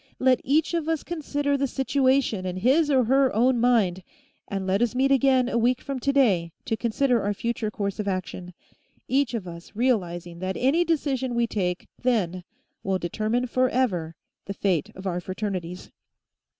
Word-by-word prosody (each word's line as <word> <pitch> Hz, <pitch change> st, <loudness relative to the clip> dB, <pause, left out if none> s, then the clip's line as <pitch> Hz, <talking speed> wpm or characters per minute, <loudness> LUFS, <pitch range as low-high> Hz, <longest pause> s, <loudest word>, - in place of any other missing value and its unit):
Let 255 Hz, -1 st, +3 dB
each 305 Hz, +5 st, +1 dB
of 330 Hz, -2 st, -1 dB
us 320 Hz, -2 st, -1 dB
consider 290 Hz, -4 st, -2 dB
the 275 Hz, 0 st, 0 dB
situation 265 Hz, -5 st, +1 dB
in 185 Hz, 0 st, -4 dB
his 275 Hz, -, +3 dB
or 265 Hz, -3 st, +4 dB
her 265 Hz, +3 st, +3 dB
own 245 Hz, +2 st, +3 dB
mind, 220 Hz, -7 st, +2 dB, 0.5 s
and 195 Hz, -1 st, -3 dB
let 190 Hz, +3 st, +1 dB
us 240 Hz, 0 st, +1 dB
meet 270 Hz, +2 st, +2 dB
again 265 Hz, -2 st, +4 dB
a 235 Hz, -2 st, 0 dB
week 245 Hz, +2 st, +2 dB
from 275 Hz, -2 st, -5 dB
today 235 Hz, -12 st, +2 dB
to 225 Hz, -, 0 dB
consider 240 Hz, +2 st, +1 dB
our 205 Hz, +1 st, -1 dB
future 230 Hz, 0 st, -2 dB
course 200 Hz, -1 st, -4 dB
of 210 Hz, -, -2 dB
action, 185 Hz, -2 st, -4 dB, 0.5 s
each 265 Hz, -2 st, +1 dB
of 200 Hz, -5 st, -4 dB
us 170 Hz, +2 st, -10 dB
realizing 175 Hz, -8 st, -1 dB
that 185 Hz, +1 st, -3 dB
any 285 Hz, +7 st, +3 dB
decision 275 Hz, -6 st, -1 dB
we 235 Hz, 0 st, +2 dB
take 180 Hz, -5 st, -2 dB
then 185 Hz, -8 st, 0 dB, 0.4 s
will 190 Hz, 0 st, 0 dB
determine 215 Hz, +7 st, -1 dB
forever 245 Hz, -10 st, 0 dB, 0.3 s
the 200 Hz, -, -5 dB
fate 180 Hz, -8 st, 0 dB
of 190 Hz, -, -10 dB
our 180 Hz, -2 st, -2 dB
Fraternities." 185 Hz, -2 st, -5 dB
235 Hz, 170 wpm, -25 LUFS, 185-265 Hz, 0.5 s, or